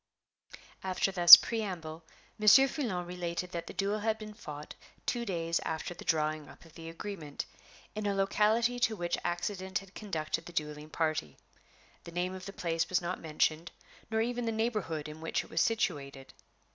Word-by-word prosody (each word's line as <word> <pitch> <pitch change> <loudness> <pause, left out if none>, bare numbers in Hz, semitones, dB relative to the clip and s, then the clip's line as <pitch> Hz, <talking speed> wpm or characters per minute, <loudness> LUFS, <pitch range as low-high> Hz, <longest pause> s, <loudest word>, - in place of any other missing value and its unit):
After 190 +1 0
thus 175 -2 +13
preamble, 180 -8 -4 0.4
Monsieur 215 +6 +7
Foulon 225 - -3
related 175 0 -4
that 170 -1 -5
the - - -7
duel 200 +2 -1
had 220 +1 0
been 215 -1 -9
fought 150 -6 -9 0.3
two 240 -1 -1
days 165 -4 -1
after 160 +2 -4
the - - -11
drawing 155 -1 -1
up - - -16
of 165 - -18
the 165 0 -9
agreement, 165 -4 -6 0.5
in 210 -1 -3
a 200 - 0
locality 215 +5 +2
to 225 -2 +1
which 175 -3 -1
accident 185 +2 -2
had 195 -1 -9
conducted 165 -5 -4
the 175 - -10
dueling 150 -1 -4
party. 155 - -2 0.7
(The 170 - -9
name 180 +1 -2
of 185 0 -8
the - - -6
place 165 -3 -2
was 185 - +2
not 175 +1 -4
mentioned, 155 +1 0 0.4
nor 220 0 0
even 240 +1 -2
the - - +1
neighborhood 215 -9 -2
in 155 +1 -10
which 165 - -1
it - - -17
was 160 - +1
situated.) 140 -11 -2
175 Hz, 175 wpm, -31 LUFS, 160-210 Hz, 0.7 s, thus